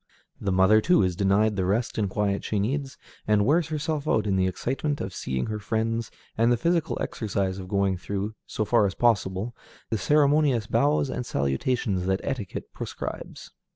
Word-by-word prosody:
The 100 - -1
mother, 95 +4 +5
too, 180 - +4
is 90 -1 0
denied 100 +3 +2
the 95 - 0
rest 110 +6 0
and 100 -2 0
quiet 100 0 -1
she 105 - -2
needs, 135 +7 -2 0.3
and 105 -1 +3
wears 155 +5 +3
herself 155 -1 -2
out 110 -6 +2
in 100 -2 +1
the 95 0 +2
excitement 135 - -2
of 95 0 -4
seeing 65 -1 -2
her 110 -1 -3
friends, 115 +2 -1 0.3
and 115 +2 +3
the 120 - +3
physical 170 +5 0
exercise 100 -3 -2
of 95 - -7
going 100 -1 +1
through, 100 +3 -4
so 110 - -2
far 105 -1 +3
as 95 - -5
possible, 110 -1 +1 0.4
the 110 - 0
ceremonious 145 -1 +3
bows 140 +5 +2
and 125 - -3
salutations 90 - -1
that 95 0 +1
etiquette 125 -9 -5
prescribes. - - -7
110 Hz, 180 wpm, -26 LUFS, 95-130 Hz, 0.4 s, mother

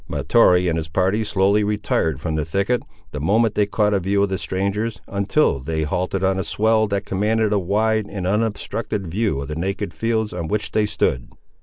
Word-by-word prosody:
Mahtoree 90 0 +3
and 80 -1 0
his 80 -1 -3
party 95 +6 +1
slowly 100 0 +2
retired 100 -8 0
from 80 +2 -3
the 80 -1 0
thicket, 100 +10 0 0.3
the 75 - -5
moment 110 +8 +2
they 105 -1 +1
caught 105 0 +1
a 100 - +2
view 100 +2 +1
of 100 - 0
the 95 - -1
strangers, 100 +4 -2
until 100 - +1
they 80 +4 -2
halted 90 +5 -2
on 95 0 +1
a - - -1
swell 110 +2 +2
that 100 +1 -2
commanded 105 +2 +1
a 105 - +2
wide 110 +3 +1
and 100 -3 -5
unobstructed 105 0 -2
view 90 -3 -1
of 70 - -6
the 75 - -5
naked 95 +2 -3
fields 110 +4 -1
on 85 -2 -4
which 105 +4 -2
they 105 -1 +1
stood. - - -1
100 Hz, 200 wpm, -21 LUFS, 90-105 Hz, 0.3 s, Mahtoree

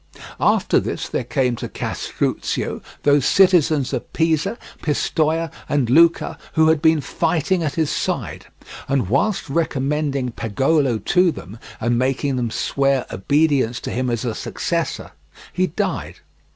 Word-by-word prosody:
After - - +3
this - - -4
there - - -2
came 125 -1 0
to - - -5
Castruccio - - -3 0.2
those 145 -1 +4
citizens 160 -8 +3
of 125 - -4
Pisa, 165 +6 +1 0.2
Pistoia, 160 +1 0 0.2
and 135 -5 +1
Lucca, 165 +4 +4
who 160 -1 +4
had 160 -2 +2
been 160 -1 +4
fighting 175 +5 0
at 155 -3 -2
his 160 -3 0
side, - - -3 0.4
and 135 -9 0
whilst 190 - +1
recommending 140 -3 -1
Pagolo 125 +4 +1
to 180 - +2
them, 110 - -10 0.2
and 120 +1 +1
making 135 +1 0
them 120 -2 -1
swear 135 +3 0
obedience 140 +1 +1
to - - -5
him 130 0 -1
as 115 -1 -2
his 120 -3 -3
successor, - - -3 0.4
he 185 0 +1
died. 165 - -3
145 Hz, 140 wpm, -21 LUFS, 125-160 Hz, 0.4 s, those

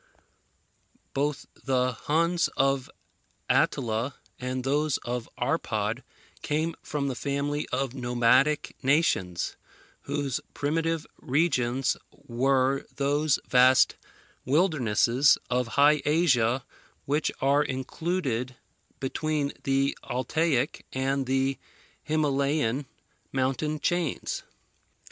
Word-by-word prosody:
Both 145 +1 -1
the 130 -1 0
Huns 165 +7 +1
of 135 -1 +1 0.6
Attila 120 +1 +1 0.2
and 125 0 -3
those 145 +2 +1
of 120 -1 -3
Arpad - - -1 0.4
came 155 +3 -1
from 140 -2 -2
the 135 - -1
family 140 +3 -2
of 130 -1 -1
nomadic 125 +3 +2
nations, 130 - +1 0.5
whose 140 -3 -1 0.2
primitive 165 +2 -1 0.2
regions 135 -4 +1
were 130 +2 +1
those 145 +1 +2
vast 125 0 +5 0.5
wildernesses 135 - +3
of 125 -1 +1
High 145 +1 +6
Asia 130 -6 +2 0.4
which 145 +2 0
are 140 +2 +3
included 130 -2 -2 0.4
between 145 +1 -1
the 135 0 +2
Altaic 135 +2 0
and 135 0 -1
the 135 0 +1 0.4
Himalayan 140 -3 0 0.4
mountain 135 +4 -1
chains. 175 -1 -1
135 Hz, 90 wpm, -27 LUFS, 130-150 Hz, 0.6 s, High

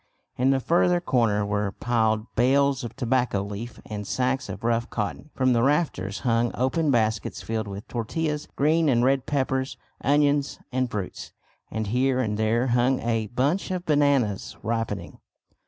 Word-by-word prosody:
In 130 +2 +2
the 135 -1 +3
further 175 +5 +3
corner 115 - +1
were 105 -1 -1
piled 110 -2 +1
bales 135 +2 +3
of 120 -1 -6
tobacco 125 -5 0
leaf 105 +4 -7
and 105 -2 -6
sacks 130 0 -1
of - - -7
rough 115 0 0
cotton. 110 +7 -4
From 130 -1 +3
the 115 - +2
rafters 130 - 0
hung 120 -1 +2
open 140 +5 +1
baskets 110 -4 0
filled 110 -1 -2
with 100 +3 -7
tortillas, 150 +6 -2
green 155 +2 +3
and 120 -2 +3
red 135 0 +2
peppers, 130 -1 -1 0.3
onions 145 0 +2
and 130 0 0
fruits, 100 -5 -5 0.4
and 110 0 -3
here 125 +5 +1
and 110 -4 0
there 110 +3 +1
hung 125 +2 +2
a 115 -2 0
bunch 135 - 0
of 185 -1 -3
bananas 140 - +1
ripening. 115 0 -3
125 Hz, 155 wpm, -25 LUFS, 110-140 Hz, 0.4 s, the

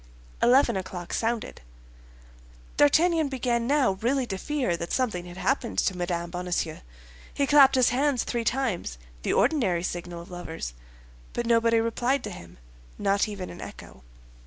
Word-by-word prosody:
Eleven 245 -1 +5
o'clock 185 -2 -5
sounded. 230 0 -2 1.1
D'Artagnan 315 +1 +4
began 240 -3 -1
now 280 -5 +3
really 260 +3 +1
to 195 -5 -4
fear 275 -11 -1
that 170 0 -5
something 215 -9 -1
had 175 +1 -10
happened 255 +1 -1
to 190 - +1
Mme. 175 -1 -3
Bonacieux. 175 -3 -2 0.5
He 280 - 0
clapped 275 -1 +6
his 255 -2 +4
hands 265 0 +1
three 235 -1 -2
times—the - - -3
ordinary 190 - +2
signal 175 -1 -5
of 175 - -16
lovers; 165 - -6 0.6
but 240 - -2
nobody 230 0 +3
replied 240 +4 0
to - - -5
him, 85 -3 -11 0.4
not 200 +1 +1
even 200 -3 -6
an - - -10
echo. 65 - -10
230 Hz, 145 wpm, -26 LUFS, 175-260 Hz, 1.1 s, clapped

